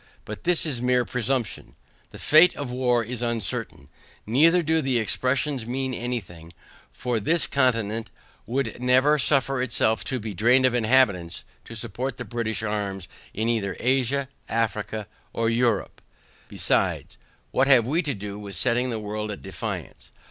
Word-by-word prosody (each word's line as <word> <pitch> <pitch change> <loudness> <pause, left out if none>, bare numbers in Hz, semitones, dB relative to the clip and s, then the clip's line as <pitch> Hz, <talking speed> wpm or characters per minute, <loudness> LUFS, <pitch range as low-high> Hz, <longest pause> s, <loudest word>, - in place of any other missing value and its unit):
But 110 0 -8
this 175 -1 +5
is 135 -7 -2
mere 125 0 +2
presumption; 125 -4 -2 0.3
the - - -12
fate 160 +4 +5
of 140 -4 -5
war 125 -2 +1
is 120 +1 -5
uncertain, 115 -5 -3 0.4
neither 165 +10 +4
do 160 +1 +1
the 130 -3 +1
expressions 130 +3 -1
mean 130 +1 -2
any 120 0 -2
thing; 85 -4 -14 0.4
for 120 - -2
this 165 +10 +1
continent 115 -4 0 0.4
would 120 -1 -2
never 130 +4 +4
suffer 135 -1 +2
itself 110 -2 0
to 130 -2 -2
be 110 -1 -5
drained 125 +7 +4
of 130 - +3
inhabitants, 110 -8 +2 0.2
to 115 - -10
support 120 +4 -4
the - - -6
British 115 -2 -3
arms 100 -4 -3 0.3
in 110 +2 -1
either 105 -5 -1
Asia, 135 +2 +1 0.2
Africa, 110 -1 -2 0.3
or 115 0 0
Europe. 115 -3 0 0.5
Besides, - - -1 0.3
what 130 - +2
have 130 -5 +6
we 155 +8 +1
to 145 -6 -3
do 100 0 -7
with 100 -2 -7
setting 125 +8 +1
the 115 - -2
world 105 0 -4
at 105 - -7
defiance? - - -6
120 Hz, 155 wpm, -25 LUFS, 110-130 Hz, 0.5 s, have